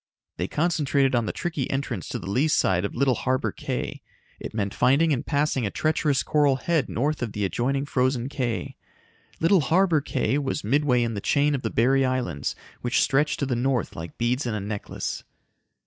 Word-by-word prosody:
They 90 - -1
concentrated 145 - +1
on 120 -3 +1
the - - 0
tricky 160 -7 -3
entrance 130 - -3
to - - -3
the 85 - -8
lee 125 +10 +2
side 95 - +2
of - - -5
Little 135 +1 +3
Harbor 130 +2 0
Cay. - - -4 0.4
It - - -6
meant 100 -2 -2
finding 150 +5 +3
and 125 - -1
passing 140 -3 0
a 105 - 0
treacherous 155 +1 +1
coral 145 -3 +3
head 160 +3 0
north 145 +5 -1
of 115 -4 -3
the 105 -1 -1
adjoining 135 - -1
Frozen 130 -3 0
Cay. 125 -5 -3 0.6
Little 175 +2 +4
Harbor 165 0 +3
Cay 140 0 0
was 140 +1 -2
midway 125 0 +2
in 115 -1 -1
the 100 - -4
chain 145 +5 +2
of 135 - -1
the 110 - -2
Berry 135 +5 +3
Islands 125 - -1 0.3
which 120 0 +1
stretched 145 +2 +1
to - - +2
the 130 -2 -1
north 125 -1 0
like 80 +1 -8
beads 125 +3 0
in 110 - -1
a - - -2
necklace. 100 +1 -4
130 Hz, 195 wpm, -25 LUFS, 120-145 Hz, 0.6 s, Little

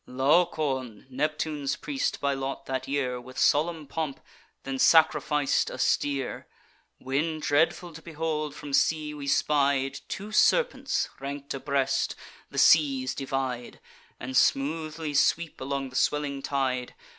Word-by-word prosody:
Laocoon, 135 -4 +1
Neptune's 150 +1 -1
priest 275 -3 -2
by 140 0 +1
lot 135 0 -4
that 130 -1 -3
year, 130 -3 -1
With 130 +1 -13
solemn 155 +1 +2
pomp 150 -1 -4 0.4
then 135 0 -4
sacrific'd 150 -3 +3
a - - -7
steer; 140 -3 -1 0.5
When, 155 +5 -1
dreadful 160 +3 +1
to 165 - -10
behold, 155 -2 -3
from 145 -1 -8
sea 155 +1 +2
we 145 -1 -7
spied 140 -1 +1
Two 205 +2 -6
serpents, - - +2
rank'd 140 +1 -5
abreast, 135 0 0 0.3
the - - -9
seas 135 -5 +4
divide, 130 -3 -4 0.4
And 130 - -6
smoothly 155 +3 +1
sweep 165 +2 +1
along 135 0 -3
the - - -13
swelling 140 0 0
tide. 130 -3 -2
140 Hz, 125 wpm, -27 LUFS, 135-155 Hz, 0.5 s, seas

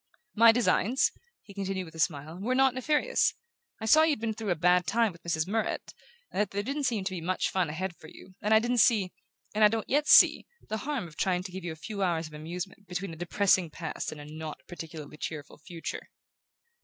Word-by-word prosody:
"My 230 +1 +7
designs," 240 +1 +2 0.3
he 200 - -13
continued 195 -1 -3
with 160 - -13
a 160 - -11
smile, 155 +1 -1
"were 250 +5 0
not 265 -1 +4
nefarious. 295 +4 +1 0.4
I 220 - -5
saw 310 +8 +6
you'd 315 -6 +2
been 225 0 -2
through 215 -1 -5
a 175 - +2
bad 180 +2 +3
time 230 0 +2
with 170 - -17
Mrs. 160 -1 -1
Murrett, 220 +2 -2 0.4
and - - 0
that 210 - 0
there 200 +1 -3
didn't 280 +4 -2
seem 225 -6 0
to 190 - -2
be 180 -3 -4
much 180 +3 -1
fun 185 -4 0
ahead 175 +3 -4
for 160 - -14
you; 185 - -14
and 210 - -1
I 220 - +8
didn't 240 +2 +1
see 210 -6 +4 0.4
and 215 +1 +2
I - - +10
don't 220 0 -2
yet 290 +2 +1
see - - +7 0.2
the 220 - -1
harm 265 -4 -3
of 155 - -16
trying 180 -1 0
to 185 - -7
give 190 0 -7
you 175 - -4
a - - -7
few 195 +6 -6
hours 170 -3 0
of 155 - -11
amusement 180 +6 -7
between 180 0 -4
a - - -8
depressing 175 +1 +2
past 160 +1 -5
and 155 - -9
a 145 - -9
not 155 0 -7
particularly 160 -3 -9
cheerful 150 -2 -6
future." 165 +2 -7
190 Hz, 230 wpm, -29 LUFS, 165-220 Hz, 0.4 s, I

